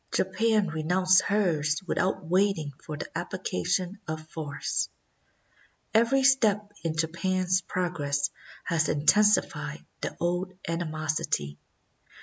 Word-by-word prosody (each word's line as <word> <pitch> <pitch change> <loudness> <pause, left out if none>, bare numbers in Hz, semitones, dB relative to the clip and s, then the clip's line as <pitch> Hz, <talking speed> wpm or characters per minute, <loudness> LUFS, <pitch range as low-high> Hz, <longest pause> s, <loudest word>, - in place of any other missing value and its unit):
Japan 210 +2 +2
renounced 180 +4 +3
hers 160 -7 +1
without 185 -1 0
waiting 180 -4 +1
for 150 -2 -6
the - - -8
application 180 - -2
of 155 0 -5
force. 150 -3 -2 1.0
Every 235 +5 +4
step 210 -6 +3
in 165 -2 -1
Japan's 185 +3 +1
progress 150 -6 -1 0.3
has 160 -2 +1
intensified 210 +8 +2 0.2
the - - -4
old 180 +2 -1
animosity. 155 - -2
175 Hz, 100 wpm, -28 LUFS, 155-195 Hz, 1.0 s, Every